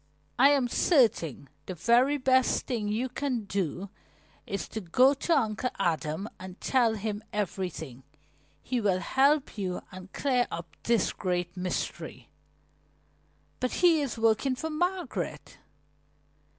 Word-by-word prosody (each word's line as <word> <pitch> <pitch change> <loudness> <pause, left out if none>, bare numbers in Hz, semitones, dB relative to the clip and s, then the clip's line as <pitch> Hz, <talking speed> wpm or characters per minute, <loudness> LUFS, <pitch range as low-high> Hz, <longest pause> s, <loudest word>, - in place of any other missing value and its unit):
"I 275 +3 +8
am 275 -4 +3
certain 225 - +2 0.2
the 185 - -5
very 240 - +3
best 260 -1 +2
thing 225 -5 -2
you 220 +5 -1
can 255 -2 -2
do 195 -1 -3 0.6
is 200 - -3
to 220 - -5
go 250 +10 +4
to 315 +3 +1
Uncle 225 0 0
Adam 160 +3 -1
and 185 0 -9
tell 240 -4 +2
him 210 0 -4
everything. 180 -10 -4 0.6
He 250 -1 -1
will 195 -3 +2
help 275 +4 +2
you 185 -2 -3
and 185 +1 -11
clear 255 -3 +1
up 165 -2 -7
this 230 -4 +1
great 180 -2 -2
mystery." 180 0 -4 1.3
"But 255 - -1
he 330 -3 +5
is 270 -4 -3
working 225 +4 +2
for 320 +5 -4
Margaret." 355 +4 -3
220 Hz, 130 wpm, -28 LUFS, 185-260 Hz, 1.3 s, I